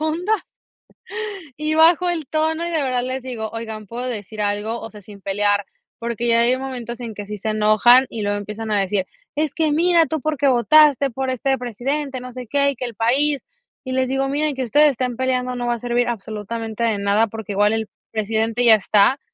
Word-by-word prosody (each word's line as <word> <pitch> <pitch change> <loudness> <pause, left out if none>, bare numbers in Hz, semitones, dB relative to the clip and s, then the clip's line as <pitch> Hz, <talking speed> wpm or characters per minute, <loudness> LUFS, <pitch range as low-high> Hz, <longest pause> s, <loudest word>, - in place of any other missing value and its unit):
profundas, 350 +7 0 1.2
y 305 +1 -1
bajo 335 +3 +5
el 325 -4 -3
tono, 320 +2 0
y - - -3
de 320 -3 0
verdad 255 -2 0
les 260 0 -3
digo: 235 -4 -5
"Oigan, 220 -2 -6
¿puedo 245 +4 -5
decir 215 -3 -6
algo?", 205 +3 -2
o 225 - -8
sea, 210 -1 -13
sin 200 0 -13
pelear, 205 +1 +1 0.4
porque 235 0 -3
ya 230 0 +4
hay 245 +2 +3
momentos 250 -3 -6
en 235 -3 -6
que 205 0 -7
sí 210 +1 -5
se 215 +2 -3
enojan 215 +4 +5
y 220 - -5
luego 205 0 0
empiezan 210 +2 -5
a 205 - +3
decir: 195 0 -1 0.3
"Es 300 -2 -1
que 315 -2 +1
mira 335 +1 +4
tú 315 -1 -3
por 310 +1 -1
qué 280 0 +2
votaste 275 +3 +5
por 265 +2 -3
este 265 +2 0
presidente, 260 +4 -3
no 250 0 -8
sé 250 -2 -8
qué, 280 +2 +2
y 280 - -5
que 250 - -4
el 235 - -9
país", 275 +6 +1 0.4
y 260 - -4
les 260 0 +1
digo: 270 +1 0
"Miren 290 0 -1
que 260 - -1
ustedes 295 +5 +5
estén 250 -2 -2
peleando 255 -1 -1
no 245 -1 -3
va 240 - +2
a - - -5
servir 240 +1 0
absolutamente 220 0 -5
de 225 -3 +1
nada, 205 +3 +2
porque 220 -1 -6
igual 205 +2 +3
el 225 -1 -2 0.2
presidente 220 +2 -1
ya 230 -2 +8
está, 210 +5 +3
240 Hz, 215 wpm, -21 LUFS, 220-275 Hz, 1.2 s, ya